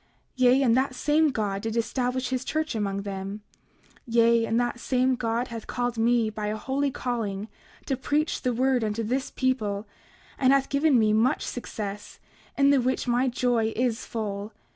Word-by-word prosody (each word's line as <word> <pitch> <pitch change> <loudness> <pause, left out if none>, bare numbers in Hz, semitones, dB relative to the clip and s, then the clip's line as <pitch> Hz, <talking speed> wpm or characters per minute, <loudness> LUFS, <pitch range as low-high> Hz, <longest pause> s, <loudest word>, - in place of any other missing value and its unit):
29:13 - - -38 0.3
Yea, 255 +1 +5
and 235 -3 +4
that 260 0 +1
same 305 +3 +3
God 205 -6 -2
did 225 +1 -3
establish 250 +2 -1
his 260 0 -1
church 310 +2 -2
among 200 -2 -2
them; 200 +1 -5 0.6
yea, 230 0 +4
and 230 - +1
that 240 0 -1
same 255 +1 +1
God 235 0 -1
hath 230 -2 -7
called 245 -1 -2
me 230 -1 +2
by 210 0 -4
a 215 +1 -2
holy 275 +5 -1
calling, 220 -6 -3 0.4
to 270 - 0
preach 295 +4 -1
the 250 - 0
word 255 0 +1
unto 215 +1 -1
this 255 +5 -1
people, 215 -6 -1 0.5
and 260 0 +5
hath 275 -1 +2
given 280 -1 +3
me 215 -2 +3
much 235 +7 +2
success, 210 -4 -6 0.4
in 280 0 +5
the 275 -2 +4
which 255 +1 -1
my 245 +2 +2
joy 240 -2 +1
is 240 -2 0
full. 210 -1 -4
240 Hz, 180 wpm, -26 LUFS, 220-260 Hz, 0.6 s, Yea